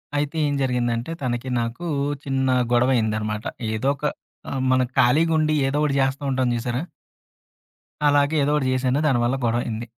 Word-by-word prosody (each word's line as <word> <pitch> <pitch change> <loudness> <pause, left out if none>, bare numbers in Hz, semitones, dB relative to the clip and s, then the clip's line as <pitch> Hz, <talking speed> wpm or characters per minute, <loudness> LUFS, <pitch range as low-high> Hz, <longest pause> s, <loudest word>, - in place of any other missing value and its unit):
అయితే 145 +2 -1
ఏం 145 - -1
జరిగిందంటే, 120 0 -1
తనకి, 120 -1 -2
నాకూ 120 +9 -4 0.4
చిన్న 135 -1 0 0.2
గొడవయిందనమాట. 110 -3 +1 0.3
ఏదో 110 +5 0
ఒక 145 - -6 0.5
ఆహ్, 135 - -2
మనకి 130 -1 +1
ఖాళీగుండి 155 +4 +3 0.2
ఏదో 140 - -1
ఒకటి 145 -2 +1
చేస్తా 135 +1 -1
ఉంటాం 130 -1 +1
చూశారా... 120 +3 -2 1.3
అలాగే 145 +1 +3
ఏదోకటి 150 -1 +1
చేశాను, 130 +1 +1
దాని 135 -5 +3
వల్ల 120 +2 +1
గొడవయింది. 115 -1 -1
130 Hz, 140 wpm, -23 LUFS, 120-145 Hz, 1.3 s, ఖాళీగుండి